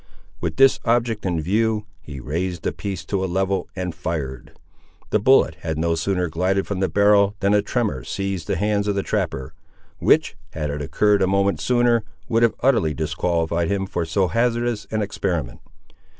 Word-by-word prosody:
With - - -3
this 135 0 +5
object 115 -3 +1
in 85 -2 0
view, 105 +5 0 0.2
he 75 -5 -9
raised 85 +5 -3
the - - 0
piece 95 -6 -5
to 95 +2 -1
a 95 - -2
level 95 0 -1
and 90 -2 -3
fired. 75 -6 -5 0.6
The 105 - +3
bullet 105 -8 +4
had 80 -2 -3
no 85 +1 +1
sooner 90 +2 0
glided 90 +4 0
from 100 -2 -3
the 95 -1 +1
barrel 100 +2 +4
than 100 +1 +2
a 105 - +4
tremor 105 - -2
seized 95 +2 -3
the - - 0
hands 105 0 0
of 100 - 0
the 100 - 0
trapper, 80 -11 -2 0.5
which, - - +3 0.2
had 75 -2 -3
it 75 +1 -4
occurred 105 +7 +2
a 95 - +3
moment 100 +1 +1
sooner, 120 -2 +2 0.2
would 115 0 +1
have 115 -1 +3
utterly 110 - +2
disqualified 85 +2 -1
him 100 -1 0
for 90 -3 -2
so 90 +4 +1
hazardous 120 0 0
an 110 -1 -1
experiment. 85 -10 -3
95 Hz, 180 wpm, -22 LUFS, 85-105 Hz, 0.6 s, this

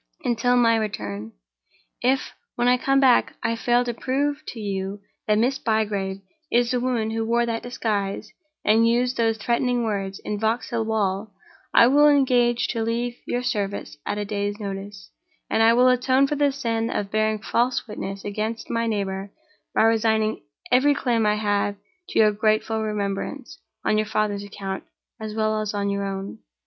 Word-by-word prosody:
until 245 +1 +2
my 230 -1 +4
return. 110 - -4 0.7
If, 260 +2 +1 0.2
when 240 0 +1
I 250 - +6
come 275 +1 +2
back, 260 -3 +4
I 230 0 +1
fail 240 +1 +2
to 240 - -2
prove 285 +5 -1
to 235 - -6
you 195 -1 -3 0.3
that 210 0 +3
Miss 250 +5 +1
Bygrave 205 -3 -1 0.3
is 240 0 +3
the 250 - +1
woman 240 -3 -1
who 225 0 -1
wore 235 +1 +1
that 230 -1 -2
disguise, 215 -4 -3 0.3
and 225 +2 +5
used 245 +2 +2
those 225 -1 +1
threatening 240 +2 0
words, 195 -3 -2
in 210 -1 -2
Vauxhall 225 +1 -1
Wall, 210 -1 -1 0.4
I - - +7
will 290 +4 +6
engage 250 -4 +3
to 230 - -1
leave 235 +2 -2
your 245 +1 -1
service 205 -9 -2
at - - -3
a 205 - -2
day's 205 0 -3
notice; 195 -1 -7 0.4
and 225 - +2
I 225 +1 +6
will 250 +2 +5
atone 255 +2 +3
for 295 - -1
the 285 -1 +2
sin 230 -4 -1
of 200 -1 -3
bearing 215 0 +1
false 240 +4 0
witness 195 -2 -6
against 215 +2 -3
my 230 0 0
neighbor 195 -2 -2 0.4
by - - +4
resigning 220 -1 +2 0.3
every 280 +3 +4
claim 235 -5 +1
I 210 - +3
have 205 -1 0 0.3
to - - -4
your 215 -1 +6
grateful 215 +1 +1
remembrance, 200 - -4 0.3
on 215 - +3
your 215 - -1
father's 210 -1 -1
account 195 -1 -6 0.4
as 215 -1 -6
well 215 0 +1
as 210 -1 -3
on 200 0 0
your 200 0 -2
own. 195 0 -5
220 Hz, 175 wpm, -24 LUFS, 205-240 Hz, 0.7 s, I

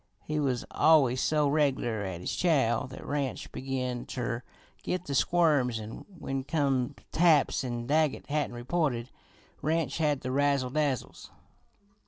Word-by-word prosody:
He 150 +5 -2
was 130 -4 0
always 135 -6 +4
so 150 -2 +2
reg'lar 135 -7 +1
at 90 -2 -5
his - - -3
chow 135 -10 +2
that 130 - -10
Ranch 140 -3 -2
he - - -12
begin 125 -2 -3
ter 120 -2 -3 0.4
git 180 0 -3
the 140 - -4
squirms 140 -7 +3
an' 110 +1 -8
when 135 -3 -3
come 140 -3 0 0.2
taps 160 -5 +4
an' 120 -2 -3
Daggett 150 +2 +1
hadn't 145 -4 -1
reported, 125 -1 -1 0.5
Ranch 160 -2 0
had 150 -4 +1
the 130 - -3
razzle 140 -2 +1
dazzles. 145 -4 -2
135 Hz, 145 wpm, -29 LUFS, 125-150 Hz, 0.5 s, always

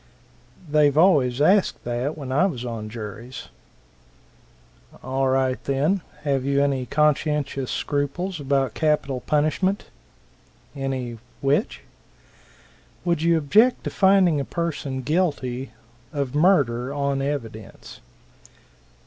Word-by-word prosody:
"They've 150 -1 +3
always 140 -8 +4
asked 190 +6 +3
that, 120 +6 -2
when 135 -4 -6
I 150 +9 +3
was 125 -10 -5
on 115 -3 -5
juries." 115 +3 -8 1.5
"All 130 +1 0
right, 130 -1 +1
then. 150 +8 +1 0.2
Have 140 -3 0
you 140 +1 +2
any 135 -3 -1
conscientious 150 -1 0
scruples 150 +5 -2
about 135 -4 0
capital 150 -4 0
punishment?" 155 +9 0 0.9
"Any 130 -4 -4 0.2
which?" 145 - 0 1.2
"Would 170 -3 +1
you 165 0 +3
object 215 - +3
to - - -3
finding 190 -5 +4
a - - -1
person 145 -5 -3
guilty 135 -5 -1 0.4
of 140 -3 -3
murder 140 -7 +2
on 140 -1 -1
evidence?" 115 -7 -6
140 Hz, 105 wpm, -23 LUFS, 130-155 Hz, 1.5 s, always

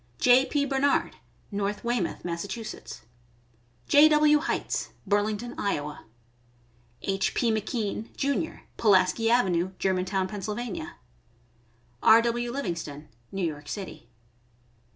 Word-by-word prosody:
J. 255 +2 +5
P. 285 -1 +1
Barnard, 275 +1 +1 0.3
North 205 0 -2
Wey 240 0 +1
mouth, 175 - -4
Mass.; 170 +2 -3
J. 120 - -1
W. 300 0 +5
Heitz, 325 - -2 0.2
Burlington, 210 +3 0
Iowa; 150 -7 -3 1.0
H. 195 -1 0
P. 235 - +2
McKean, 215 0 -2
Jr., 280 +3 -1 0.2
Pulaski 205 +2 +3
avenue, 190 -6 +2
German 185 -1 0
town, 190 0 -1
Penn.; 210 -2 -5 1.1
R.W. 235 +1 +4
Livingston, 165 - -5 0.2
New 195 -2 -1
York 145 -2 -5
City. 190 - -7
205 Hz, 105 wpm, -27 LUFS, 170-240 Hz, 1.1 s, J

